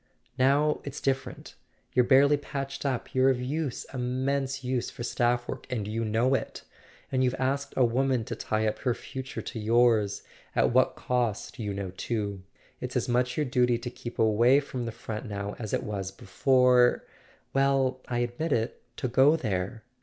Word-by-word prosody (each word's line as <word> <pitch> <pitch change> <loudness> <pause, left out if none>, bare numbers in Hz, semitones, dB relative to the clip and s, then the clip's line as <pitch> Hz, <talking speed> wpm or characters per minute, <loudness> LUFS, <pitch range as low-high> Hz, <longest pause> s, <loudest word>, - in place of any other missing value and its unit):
Now 145 +3 +3
it's 140 0 -6
differ¬ 135 -1 0
ent. - - -10 0.4
You're 125 - +5
barely 140 +3 +5
patched 140 -1 -4
up: 130 -3 -3
you're 130 +1 +4
of 130 -2 +1
use, 140 +2 -3
immense 130 +2 -1
use, 125 -1 -1
for 120 - -8
staff 120 0 +1
work, - - -6
and 110 -5 -2
you 115 +2 -2
know 115 +4 +2
it. 135 - -2 0.5
And 130 0 +2
you've 125 0 +1
asked 135 +2 -1
a 130 - +5
woman 130 +1 +1
to 115 - -5
tie 110 0 -1
up 110 0 -2
her 125 -3 0
future 130 -1 -7
to 115 - -6
yours—at 110 -3 +1
what 130 +1 +3
cost 125 0 -2
you 105 -3 -2
know 100 -2 -4
too. 100 0 -3 0.4
It's - - -5
as - - 0
much 125 +1 +1
your 150 - +1
duty 125 -2 +2
to 120 +1 -6
keep 120 -1 -8
away 115 +5 +5
from 130 -4 -5
the - - -3
front 110 +1 -6
now 100 0 -4
as 110 -3 -5
it - - 0
was 100 -3 -3
before—well, 130 +4 +1
I 120 - -2
admit 120 +7 -2
it—to 115 +2 -3
go 135 +5 +5
there. 110 - -3
125 Hz, 175 wpm, -28 LUFS, 115-135 Hz, 0.5 s, You're